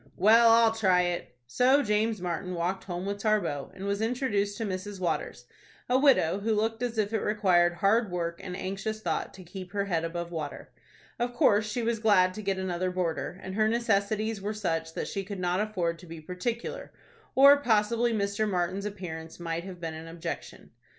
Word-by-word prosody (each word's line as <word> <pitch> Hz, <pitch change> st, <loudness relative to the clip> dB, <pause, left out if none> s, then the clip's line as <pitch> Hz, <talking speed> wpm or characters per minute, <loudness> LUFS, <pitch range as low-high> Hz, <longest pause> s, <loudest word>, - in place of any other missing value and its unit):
"Well, 225 Hz, +4 st, +6 dB
I'll 230 Hz, 0 st, +6 dB
try 190 Hz, -5 st, +3 dB
it." 175 Hz, -8 st, -3 dB
So 255 Hz, -, +3 dB
James 215 Hz, 0 st, +1 dB
Martin 180 Hz, +1 st, -3 dB
walked 175 Hz, +3 st, -2 dB
home 180 Hz, 0 st, -4 dB
with 200 Hz, 0 st, -3 dB
Tarbox, 195 Hz, -10 st, -1 dB
and 190 Hz, -, -7 dB
was 200 Hz, +1 st, -1 dB
introduced 220 Hz, -4 st, 0 dB
to 225 Hz, -, -2 dB
Mrs. 195 Hz, 0 st, -5 dB
Waters,—a 180 Hz, -, -3 dB
widow 205 Hz, -, +4 dB
who 215 Hz, +2 st, 0 dB
looked 225 Hz, +2 st, -1 dB
as 240 Hz, -2 st, -2 dB
if 215 Hz, 0 st, 0 dB
it 220 Hz, -, +2 dB
required 185 Hz, -5 st, +3 dB
hard 200 Hz, +5 st, +2 dB
work 170 Hz, -1 st, -3 dB
and 180 Hz, -1 st, -5 dB
anxious 195 Hz, +3 st, -4 dB
thought -, -, -2 dB
to 190 Hz, -, -11 dB
keep 180 Hz, +1 st, -9 dB
her 200 Hz, -1 st, 0 dB
head 170 Hz, -4 st, -1 dB
above 170 Hz, +1 st, -4 dB
water. 155 Hz, -4 st, -6 dB, 0.5 s
Of 245 Hz, 0 st, -2 dB
course 215 Hz, -7 st, +3 dB
she 235 Hz, +3 st, -2 dB
was 230 Hz, -1 st, 0 dB
glad 185 Hz, -4 st, +4 dB
to 215 Hz, -, -6 dB
get 195 Hz, -2 st, -1 dB
another 185 Hz, -1 st, -1 dB
boarder, 180 Hz, 0 st, -2 dB
and 190 Hz, -, -6 dB
her 215 Hz, +2 st, +2 dB
necessities 220 Hz, -2 st, 0 dB
were 210 Hz, +2 st, -3 dB
such 165 Hz, -5 st, -2 dB
that -, -, -3 dB
she 195 Hz, -, -3 dB
could 195 Hz, 0 st, -6 dB
not 180 Hz, 0 st, 0 dB
afford 180 Hz, -6 st, -1 dB
to 180 Hz, -, -13 dB
be 165 Hz, 0 st, -8 dB
particular, 180 Hz, +9 st, -4 dB, 0.4 s
or 280 Hz, +2 st, +8 dB
possibly 235 Hz, -2 st, +2 dB
Mr. 205 Hz, 0 st, 0 dB
Martin's 185 Hz, +1 st, -1 dB
appearance 165 Hz, -6 st, -7 dB
might 170 Hz, 0 st, -3 dB
have 185 Hz, -2 st, -8 dB
been 165 Hz, -2 st, -4 dB
an 160 Hz, +1 st, -8 dB
objection. 165 Hz, 0 st, -7 dB
200 Hz, 190 wpm, -28 LUFS, 175-220 Hz, 0.5 s, or